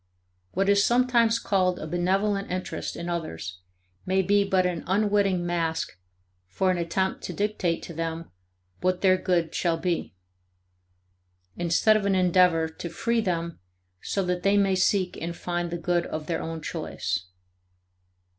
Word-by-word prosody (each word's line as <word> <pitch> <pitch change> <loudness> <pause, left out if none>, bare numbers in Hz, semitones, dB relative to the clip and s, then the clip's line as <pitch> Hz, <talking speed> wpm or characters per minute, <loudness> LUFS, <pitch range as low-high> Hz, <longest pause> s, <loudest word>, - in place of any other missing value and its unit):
What 195 +2 +1
is 200 0 +5
sometimes 235 -1 +3
called 185 -5 +1
a - - -6
benevolent 195 +4 0
interest 185 0 -4
in 170 - -5
others 90 - -4 0.4
may 190 +1 +1
be 200 +2 +3
but 190 -2 +2
an 175 -2 -1
unwitting 200 -2 +2
mask 165 - -1 0.5
for 185 - +1
an 180 - -1
attempt 190 +3 -1
to - - -5
dictate 200 -5 -1
to 170 - -7
them 165 - -4 0.5
what 185 0 0
their 185 -1 +5
good 175 -3 0
shall 170 -2 +1
be, 170 - -2 1.4
instead 175 +5 +3
of 205 -2 -1
an 195 - +2
endeavor 180 -3 +4
to 160 +2 -7
free 230 +7 0
them 170 -4 -2 0.4
so 195 - -1
that 180 0 -1
they 200 +2 +3
may 195 -1 +3
seek 185 0 +1
and 170 +1 -4
find 175 -1 -2
the 170 - -3
good 175 0 0
of 155 -1 -5
their 165 - -2
own 160 -1 -5
choice. 95 - -3
180 Hz, 155 wpm, -26 LUFS, 170-195 Hz, 1.4 s, is